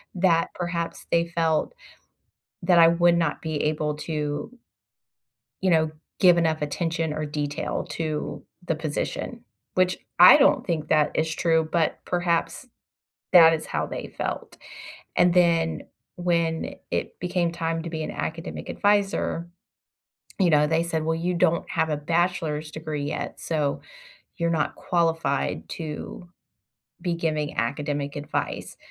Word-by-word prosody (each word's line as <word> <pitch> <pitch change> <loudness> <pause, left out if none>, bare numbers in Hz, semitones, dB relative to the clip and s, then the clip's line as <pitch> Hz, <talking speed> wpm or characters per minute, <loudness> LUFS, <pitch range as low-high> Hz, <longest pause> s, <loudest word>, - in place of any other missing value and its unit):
that 175 -3 +3
perhaps 170 -1 -4
they 170 0 +3
felt 165 - 0 0.9
that 175 0 +4
I 165 -1 +8
would 170 +1 +4
not 165 -3 0
be 160 -1 -3
able 150 0 0
to 150 0 -3 1.1
you 190 - +2
know, 160 -2 +3 0.3
give 180 -3 +6
enough 160 -2 +1
attention 160 +1 -1
or 155 0 -3
detail 145 0 -3
to 155 -2 -3 0.2
the 165 - +1
position, 155 -1 -4 0.3
which 185 0 +2 0.2
I 180 +10 +10
don't 280 -2 +4
think 160 -4 -2
that 155 -1 +3
is 160 0 0
true, 160 0 +2
but 165 -1 0
perhaps 175 +7 -1 0.7
that 165 -2 +9
is 155 -1 -2
how - - -1
they - - -6
felt. - - -5 0.6
And 175 0 +4
then, 170 -2 +3 0.3
when 170 -2 0 0.2
it - - -2
became 180 -1 0
time 165 -1 -2
to 170 - -5
be 160 -1 -4
an - - -4
academic 165 +1 -5
adviser, 200 -4 +1 0.9
you 185 -3 +4
know, 150 -2 +5
they 160 +1 +2
said, 165 -2 -2
"Well, 160 +1 0
you 175 +2 -1
don't 170 -1 +1
have 160 - 0
a 150 - 0
bachelor's 160 -1 -1
degree 155 -2 -4
yet, 145 +2 -4
so 150 -4 -1 0.6
you're 170 -1 0
not 155 -3 0
qualified 165 -5 0
to 160 +2 -7 0.7
be 175 -2 -1
giving 155 -3 -2
academic 145 +3 -2
advice." 145 0 -4
165 Hz, 140 wpm, -25 LUFS, 155-170 Hz, 1.1 s, I